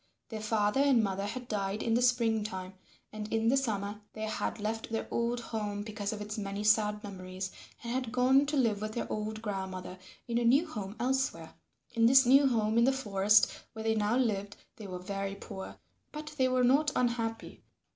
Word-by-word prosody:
Their 220 Hz, -2 st, -5 dB
father 215 Hz, +2 st, +1 dB
and 270 Hz, -5 st, +4 dB
mother 195 Hz, 0 st, -1 dB
had 245 Hz, +3 st, -6 dB
died 200 Hz, -1 st, -2 dB
in 230 Hz, -, +1 dB
the 240 Hz, -, +3 dB
spring 235 Hz, -3 st, +2 dB
time, 190 Hz, -3 st, -6 dB, 0.4 s
and 215 Hz, 0 st, -6 dB
in 225 Hz, 0 st, +2 dB
the 265 Hz, -, +4 dB
summer 210 Hz, -5 st, -2 dB
they 215 Hz, -, -6 dB
had 220 Hz, +1 st, -2 dB
left 220 Hz, +2 st, -3 dB
their 225 Hz, -, -2 dB
old 235 Hz, +1 st, 0 dB
home 210 Hz, -3 st, -4 dB
because 210 Hz, -1 st, -4 dB
of 215 Hz, -1 st, -5 dB
its 210 Hz, +1 st, -5 dB
many 200 Hz, 0 st, -4 dB
sad 210 Hz, -1 st, +3 dB
memories 190 Hz, -1 st, -6 dB, 0.3 s
and 235 Hz, 0 st, -3 dB
had 255 Hz, -3 st, -2 dB
gone 260 Hz, +3 st, +4 dB
to 295 Hz, 0 st, 0 dB
live 220 Hz, -6 st, +2 dB
with 215 Hz, 0 st, -4 dB
their 235 Hz, -, -2 dB
old 215 Hz, +1 st, -4 dB
grandmother 190 Hz, -3 st, -5 dB, 0.3 s
in 235 Hz, 0 st, 0 dB
a -, -, 0 dB
new 270 Hz, +8 st, +4 dB
home 210 Hz, -, -6 dB
elsewhere. 265 Hz, +2 st, -1 dB, 0.4 s
In 230 Hz, -1 st, +4 dB
this 265 Hz, +1 st, +7 dB
new 275 Hz, +3 st, +6 dB
home 225 Hz, -2 st, +2 dB
in 235 Hz, -, +5 dB
the 265 Hz, -, +4 dB
forest 210 Hz, -5 st, +3 dB, 0.2 s
where 220 Hz, -, -6 dB
they 225 Hz, 0 st, +2 dB
now 215 Hz, +2 st, +1 dB
lived 210 Hz, -5 st, 0 dB, 0.2 s
they 210 Hz, -, -8 dB
were 185 Hz, -1 st, -5 dB
very 195 Hz, +2 st, -4 dB
poor, 190 Hz, -1 st, -8 dB, 0.4 s
but 305 Hz, 0 st, -7 dB
they 260 Hz, -3 st, +3 dB
were 255 Hz, 0 st, +2 dB
not 285 Hz, +5 st, +4 dB
unhappy. 230 Hz, -2 st, -2 dB
220 Hz, 200 wpm, -31 LUFS, 205-245 Hz, 0.4 s, this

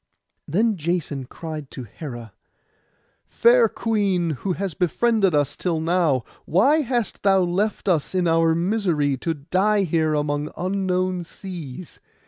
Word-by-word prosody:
Then 210 Hz, +6 st, +1 dB
Jason 155 Hz, -5 st, -2 dB
cried 155 Hz, 0 st, -7 dB
to 130 Hz, -, -8 dB
Hera, 120 Hz, -, -9 dB, 0.9 s
'Fair 235 Hz, -1 st, +4 dB
queen, 200 Hz, -8 st, 0 dB
who 180 Hz, +6 st, -2 dB
hast 190 Hz, -2 st, -4 dB
befriended 195 Hz, +1 st, +2 dB
us 145 Hz, -1 st, +1 dB
till 170 Hz, -3 st, -1 dB
now, 160 Hz, -6 st, +1 dB, 0.2 s
why 265 Hz, -, +3 dB
hast 240 Hz, -5 st, -2 dB
thou 195 Hz, -1 st, +4 dB
left 190 Hz, +5 st, -1 dB
us 175 Hz, -1 st, +1 dB
in 180 Hz, -1 st, +2 dB
our 165 Hz, 0 st, +3 dB
misery, 170 Hz, -6 st, +1 dB
to 165 Hz, +5 st, -2 dB
die 195 Hz, +8 st, +1 dB
here 160 Hz, -3 st, +1 dB
among 145 Hz, 0 st, -1 dB
unknown 185 Hz, -1 st, -1 dB
seas? 170 Hz, -4 st, -9 dB
175 Hz, 130 wpm, -23 LUFS, 150-195 Hz, 0.9 s, Fair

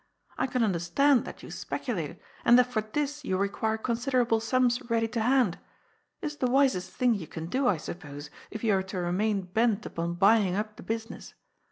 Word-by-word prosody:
I 260 Hz, -, 0 dB
can 250 Hz, -2 st, 0 dB
under 190 Hz, -6 st, +1 dB
stand 265 Hz, -, +3 dB
that -, -, -9 dB
you -, -, -9 dB
speculate, -, -, -4 dB, 0.2 s
and 240 Hz, -, +7 dB
that 250 Hz, -, +6 dB
for 215 Hz, -, +2 dB
this 290 Hz, +6 st, -3 dB
you 190 Hz, -8 st, -1 dB
require 210 Hz, +3 st, 0 dB
con 235 Hz, +1 st, -1 dB
siderable 245 Hz, -2 st, +1 dB
sums 245 Hz, +2 st, +2 dB
ready 225 Hz, -1 st, +2 dB
to 230 Hz, -1 st, -2 dB
hand. 245 Hz, -5 st, +2 dB, 0.6 s
It -, -, -2 dB
is 295 Hz, -1 st, -4 dB
the 255 Hz, -, 0 dB
wisest 255 Hz, -9 st, +2 dB
thing 250 Hz, +3 st, +2 dB
you 185 Hz, -7 st, -4 dB
can 160 Hz, +2 st, -6 dB
do, 255 Hz, +9 st, 0 dB
I 195 Hz, -, +3 dB
suppose, 150 Hz, -2 st, -8 dB, 0.2 s
if 220 Hz, -, -7 dB
you 220 Hz, -3 st, +3 dB
are 190 Hz, -, +2 dB
to 190 Hz, 0 st, -6 dB
remain 190 Hz, +3 st, 0 dB
bent 215 Hz, +3 st, +1 dB
upon 170 Hz, +1 st, -3 dB
buying 195 Hz, 0 st, +4 dB
up 210 Hz, +1 st, -3 dB
the -, -, -9 dB
business. 225 Hz, 0 st, -5 dB
220 Hz, 205 wpm, -28 LUFS, 190-250 Hz, 0.6 s, and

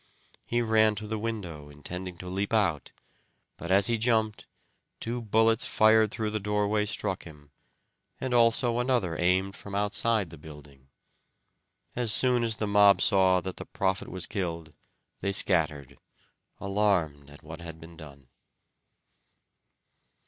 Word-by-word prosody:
He 120 Hz, 0 st, 0 dB
ran 110 Hz, -1 st, +3 dB
to 105 Hz, +1 st, -6 dB
the 110 Hz, 0 st, -4 dB
window, 90 Hz, -10 st, -5 dB
intending 90 Hz, +5 st, -7 dB
to 90 Hz, -, -9 dB
leap 100 Hz, +4 st, -2 dB
out, 90 Hz, -9 st, 0 dB, 0.7 s
but 85 Hz, -, -8 dB
as 95 Hz, +1 st, +4 dB
he 115 Hz, +1 st, +1 dB
jumped 110 Hz, -2 st, 0 dB, 0.5 s
two 120 Hz, +1 st, -4 dB
bullets 115 Hz, +1 st, +2 dB
fired 110 Hz, 0 st, +4 dB
through 110 Hz, 0 st, -3 dB
the 110 Hz, -, -2 dB
doorway 105 Hz, +1 st, 0 dB
struck 100 Hz, -3 st, -3 dB
him, 75 Hz, -3 st, -14 dB, 0.7 s
and 130 Hz, -1 st, -3 dB
also 120 Hz, 0 st, +3 dB
another 120 Hz, -9 st, 0 dB
aimed 95 Hz, +2 st, +1 dB
from 100 Hz, -1 st, -9 dB
outside 105 Hz, -1 st, 0 dB
the 85 Hz, -, -12 dB
building. 70 Hz, -3 st, -14 dB, 1.1 s
As 120 Hz, -3 st, 0 dB
soon 125 Hz, +2 st, +3 dB
as 115 Hz, -1 st, +1 dB
the 110 Hz, -, -2 dB
mob 100 Hz, -1 st, +5 dB
saw 95 Hz, -2 st, +4 dB
that 95 Hz, 0 st, -6 dB
the -, -, -7 dB
prophet 95 Hz, -1 st, -2 dB
was 95 Hz, -2 st, -2 dB
killed 85 Hz, -5 st, -5 dB, 0.5 s
they 100 Hz, -, -2 dB
scattered, 75 Hz, -8 st, +1 dB, 0.6 s
alarmed 95 Hz, -8 st, 0 dB
at 70 Hz, -, -16 dB
what 80 Hz, +2 st, -10 dB
had 85 Hz, -1 st, -9 dB
been 85 Hz, +1 st, -13 dB
done. 70 Hz, -4 st, -13 dB
100 Hz, 140 wpm, -27 LUFS, 85-110 Hz, 1.1 s, mob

